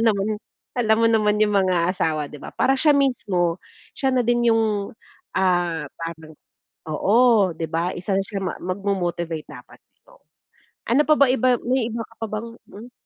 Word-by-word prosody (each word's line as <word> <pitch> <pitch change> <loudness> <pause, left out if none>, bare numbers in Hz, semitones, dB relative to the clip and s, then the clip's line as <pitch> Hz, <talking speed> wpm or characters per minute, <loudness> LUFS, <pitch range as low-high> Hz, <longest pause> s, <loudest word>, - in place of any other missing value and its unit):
naman, 205 -2 +2 0.5
alam 220 -2 +3
mo 230 - +5
naman 210 -2 +2
yung 210 -1 +2
mga 180 -3 +2
asawa 155 -5 -1
'di 150 - -9
ba? - - -8
Para 270 - +2
siya 300 0 +5
mismo, 190 -11 +1 0.4
siya 265 -1 0
na 250 - +3
din 240 -1 +3
yung, 215 -3 0 0.4
ah, 175 -4 +1
parang 160 -1 -8 0.5
oo, 205 +3 +3
'di 160 0 -4
ba? 170 +2 -1
Isa 190 +2 -2
na 195 - 0
siya 195 0 -5
ma 185 - -3
magmo-motivate 175 -4 -3
dapat - - -13
dito. - - -25 0.7
Ano 275 +5 +5
pa 305 - +7
bang 260 -2 +5
ibang, 250 0 +3
may 255 -2 +1
iba 230 0 -4
ka 225 - -20
pa - - 0
bang, 215 +2 -4 0.2
hmm 230 +5 -11
200 Hz, 175 wpm, -22 LUFS, 175-235 Hz, 0.7 s, pa